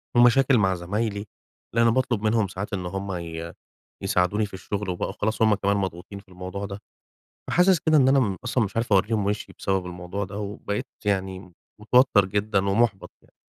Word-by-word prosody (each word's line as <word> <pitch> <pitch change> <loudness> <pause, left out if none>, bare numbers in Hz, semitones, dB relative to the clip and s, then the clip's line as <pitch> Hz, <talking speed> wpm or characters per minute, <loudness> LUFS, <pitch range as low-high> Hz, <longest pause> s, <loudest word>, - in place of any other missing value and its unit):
ومشاكل 120 +2 +5
مع 95 -2 +2
زمايلي، 100 +4 -2 0.5
لإن 115 - +4
أنا 115 - +5
باطلُب 125 -5 0
منهم 110 -1 +2
ساعات 95 +3 -6
إن 90 -2 -2
هُم 95 +2 -4
ي 85 -1 -6 0.5
يساعدوني 95 +3 +1
في 100 - -12
الشغل، 100 +1 -4
وبقوا 90 +1 -2
خلاص 110 +3 -2
هُم 110 -1 +5
كمان 100 +1 0
مضغوطين 95 +1 -4
في 100 -1 -21
الموضوع 90 +2 -6
ده. 100 0 -7 0.7
فحاسس 180 -1 +4
كده 155 -1 +3
إن 130 -2 +5
أنا 135 0 +5
م 100 -6 0
أصلًا 125 -1 +1
مش 100 +2 -6
عارف 115 -1 0
أورّيهم 105 +1 +2
وِشي 105 +1 -2
بسبب 95 -2 -1
الموضوع 90 +3 -5
ده، 100 +2 -7
وبقيت 100 0 -4 0.2
يعني 95 -2 -2 0.3
متوتَّر 115 -1 +4
جدًا 105 +1 0
ومُحبَط 105 -1 +1
يعني. - - -27
100 Hz, 180 wpm, -25 LUFS, 95-110 Hz, 0.7 s, ومشاكل